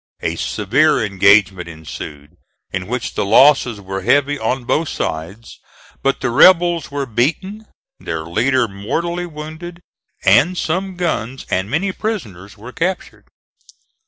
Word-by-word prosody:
A - - -2
severe 130 +10 +1
engagement 100 -2 +3
ensued 75 -2 -9 0.4
in 95 -1 -4
which 125 +1 -3
the - - -1
losses 120 +1 +4
were 95 -1 -5
heavy 145 0 +2
on 130 -1 -1
both 155 +5 0
sides, 85 +9 -5 0.4
but 135 0 0
the - - -1
rebels 175 +3 +5
were 140 -1 -3
beaten, 170 - -2 0.3
their 80 -1 -4
leader 120 +9 +1
mortally 165 - -3
wounded, 160 +2 -9 0.5
and 180 +1 +4
some 185 +4 -2
guns 135 -8 -3
and 95 +2 0
many 180 - 0
prisoners 115 - -5
were 115 +5 -10
captured. 180 +7 -4
130 Hz, 130 wpm, -18 LUFS, 100-170 Hz, 0.5 s, rebels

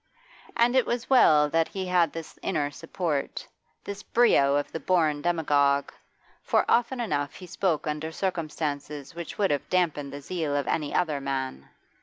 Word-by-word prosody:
And 240 +2 +3
it 260 - +3
was 240 +2 -3
well 150 - +6
that 165 0 +2
he 190 -1 -5
had 175 -3 +2
this 165 -1 -9
inner 150 -6 -1
support, 160 -1 -3 0.4
this 200 0 -6
brio 140 -15 +3
of 145 - -1
the 165 - -4
born 160 -5 +1
demagogue, 145 -4 +2 0.5
for - - +2
often 245 +2 +2
enough 145 -11 -2
he 185 - -10
spoke 180 -3 -1
under 155 +1 -3
circumstances 150 -5 -3
which 170 0 -7
would 200 -5 +2
have 145 - -2
damped 180 -4 +2
the 140 +1 -7
zeal 155 -1 -2
of 145 - 0
any 150 -2 -1
other 155 -5 0
man. 130 - -4
160 Hz, 165 wpm, -27 LUFS, 145-185 Hz, 0.5 s, well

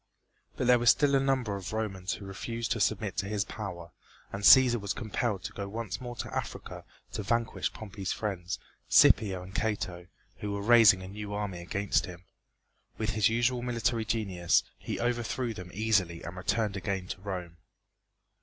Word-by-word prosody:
But - - -1
there 125 0 +6
were 120 - -1
still 145 +4 +5
a 135 - +5
number 130 -6 0
of 100 +1 -6
Romans 95 -4 -2
who 100 - -8
refused 115 +4 -4
to 115 - +1
submit 105 -1 0
to 95 - -1
his 105 -1 -1
power, 90 -6 -7 0.4
and 100 - -4
Cæsar 120 +4 +8
was 100 - -2
compelled 110 -3 -2
to - - -6
go 100 -1 -5
once 110 -1 -5
more 120 -1 -6
to - - -6
Africa - - -5 0.3
to 105 - -2
vanquish 115 +3 -1
Pompey's 100 -3 -6
friends, 95 -4 -3 0.3
Scipio 95 -4 +5
and 95 +1 -11
Cato, 95 -5 -2 0.3
who 105 -1 -4
were 100 0 -3
raising 110 -4 +7
a - - -7
new 105 +1 -6
army 100 -4 -3
against 100 +3 0
him. 90 0 -10 0.7
With 110 -2 -1
his 110 -1 +3
usual 120 +2 +1
military 120 -1 0
genius, 100 -6 +1 0.2
he - - -4
overthrew 120 0 -1
them 90 -3 -9
easily 100 -6 +1
and 85 - -7
returned 100 +2 -1
again 95 -1 -3
to 95 - -6
Rome. 90 -4 -5
105 Hz, 175 wpm, -29 LUFS, 95-115 Hz, 0.7 s, Cæsar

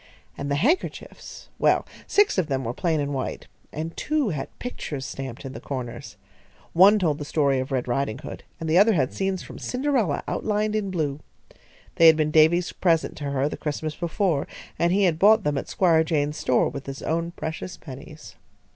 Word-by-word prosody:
And 140 - -5
the 140 - +1
handkerchiefs 275 - -2
well, - - +3 0.2
six 410 - +3
of 175 - 0
them 135 -3 -1
were 115 0 -3
plain 160 +2 0
and 145 0 -2
white, 130 -2 -4 0.3
and 160 +2 -5
two 300 -6 0
had 150 -6 -3
pictures 145 - -5
stamped 130 -1 -7
in 135 - -6
the - - -7
corners. 125 -4 -6 0.6
One 195 +5 +7
told 160 -6 0
the - - -4
story 140 -2 +1
of 130 +1 -4
Red 130 -2 -1
Ridinghood 120 -2 -3 0.2
and 165 - -4
the 160 +3 +4
other 220 +2 +6
had 135 -8 +1
scenes 190 -1 -2
from - - -10
Cinderella 250 - 0
outlined 215 0 -1
in 210 -2 -1
blue. 150 -6 -2 0.8
They 165 - +8
had 160 -1 +7
been 155 -1 +1
Davy's 160 +3 +4
present 165 -3 +1
to 145 - -5
her 140 0 0
the - - -5
Christmas 155 0 -3
before, 170 -3 0 0.3
and 170 0 +3
he 200 +2 +3
had 165 -4 +2
bought 215 +2 +6
them 150 -3 0
at - - -4
Squire 165 -4 +3
Jaynes's 150 -2 -1
store 125 - +3
with 140 - -7
his 135 0 -6
own 165 +1 -1
precious 160 +2 -5
pennies. 135 - -11
160 Hz, 190 wpm, -25 LUFS, 140-185 Hz, 0.8 s, They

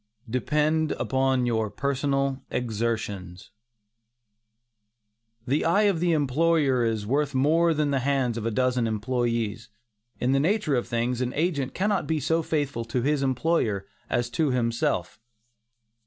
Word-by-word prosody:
DEPEND 150 +6 +1
UPON 130 -1 +1
YOUR 110 -2 +1
OWN 105 - -7
PERSONAL 135 -1 -1
EXERTIONS. 110 -6 -3 1.9
The 135 +4 +1
eye 195 +6 +3
of 200 -5 +2
the 175 0 +2
employer 145 -2 +2
is 110 -2 0
often 105 - -6
worth 145 0 +1
more 165 +5 +3
than 150 -1 +1
the 135 - +1
hands 130 -3 0
of 115 - -4
a 115 - 0
dozen 125 0 +1
employees. 115 0 -2 0.5
In 125 - +1
the 135 - +3
nature 175 0 +1
of 120 -2 0
things, 120 +1 -1
an 125 0 -1
agent 150 -4 -1
cannot 205 0 0
be 160 -1 0
so 160 +4 +1
faithful 145 -7 -2
to 120 +2 -2
his 145 +1 +1
employer 130 - 0 0.2
as 120 0 -1
to 155 +3 +1
himself. 120 -3 -1
130 Hz, 145 wpm, -26 LUFS, 115-150 Hz, 1.9 s, eye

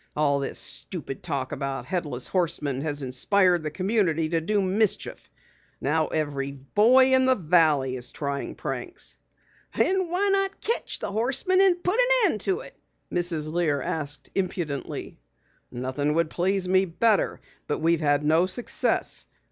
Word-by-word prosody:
All 145 -2 +2
this 135 - -3
stupid 155 -7 -3
talk 140 -6 -3
about 135 -1 -4
Headless 150 -9 -3
Horsemen 155 -7 -1
has 145 -2 -3
inspired 175 +8 +2
the 155 - -3
community 185 -3 0
to 165 0 0
do 205 +6 0
mischief. 200 +2 -1 0.5
Now 155 +2 0
every 140 -3 -2
boy 225 - +4
in 260 0 +4
the 260 0 +4
Valley 155 - +2
is 125 -1 -5
trying 140 -1 -4
pranks." - - -5 0.6
"Then 375 -2 +1
why 380 +4 +1
not 390 0 0
ketch 465 - -1
the - - -4
Horseman 270 - +2
and 360 -2 +3
put 375 +7 +2
an - - +6
end 210 - -4
to 385 +4 -1
it?" - - -13 0.4
Mrs. 165 -3 0
Lear 160 -5 +1
asked 145 0 -4
impudently. 175 -8 -4 0.5
"Nothing 130 +4 -2
would 165 -1 +1
please 185 +1 0
me 185 +1 +3
better. 200 +5 +1 0.3
But - - -1
we've 165 +1 +1
had 145 -1 +2
no 160 +4 +3
success. 240 +5 -1
170 Hz, 150 wpm, -25 LUFS, 145-215 Hz, 0.6 s, an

